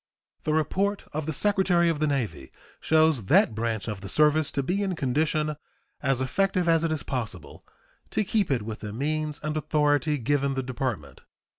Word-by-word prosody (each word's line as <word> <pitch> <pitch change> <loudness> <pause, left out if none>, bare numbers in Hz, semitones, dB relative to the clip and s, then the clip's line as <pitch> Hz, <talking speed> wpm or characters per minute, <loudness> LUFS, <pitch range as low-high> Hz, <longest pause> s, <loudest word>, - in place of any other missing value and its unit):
The 155 - +1
report 195 +6 0
of 155 0 -3
the - - 0
Secretary 185 0 +2
of 165 -3 0
the 155 - +1
Navy 105 - -2 0.3
shows 155 -8 +3
that 105 - +4
branch 110 -1 -2
of 105 -3 -4
the 100 - -7
service 150 +4 +3
to 140 - 0
be 185 +8 -1
in 190 -3 -1
condition 150 +2 0 0.4
as 135 -2 +1
effective 185 +6 0
as 165 -1 +4
it 165 - 0
is 155 - -2
possible 105 - -5 0.5
to - - 0
keep 200 -2 +1
it 125 -6 0
with 110 0 -6
the 105 -1 -6
means 150 +4 -2
and 155 0 -2
authority 150 0 +1
given 140 +2 0
the 130 - -1
Department. 120 - -4
150 Hz, 180 wpm, -26 LUFS, 125-160 Hz, 0.5 s, that